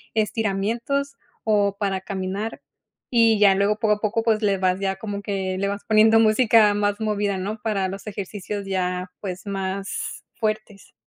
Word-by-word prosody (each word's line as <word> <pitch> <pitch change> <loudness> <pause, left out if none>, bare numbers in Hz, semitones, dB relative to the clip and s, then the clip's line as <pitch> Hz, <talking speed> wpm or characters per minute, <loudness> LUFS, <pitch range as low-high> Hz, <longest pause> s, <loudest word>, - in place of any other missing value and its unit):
estiramientos 225 +6 -1 0.3
o 205 -2 +2
para 195 -2 -1
caminar 195 +3 -4 0.5
y 230 -2 +5
ya 200 -2 +6
luego, 200 +2 +2
poco 215 -2 +3
a 210 - -12
poco, 225 +1 0
pues, 225 -1 +2
le 200 -1 +2
vas 185 0 +1
ya 195 -1 -1
como 205 -1 -5
que 190 -2 -2
le 200 - 0
vas 200 0 -4
poniendo 220 +1 +6
música 220 -1 +5
más 205 0 0
movida, 205 -2 0
¿no? 210 +3 -4
Para 200 -4 0
los 195 +3 -8
ejercicios 200 0 -5
ya, 180 -1 -2
pues, 185 -1 -6
más 195 0 -4
fuertes. 215 -3 -4
205 Hz, 165 wpm, -23 LUFS, 195-215 Hz, 0.5 s, ya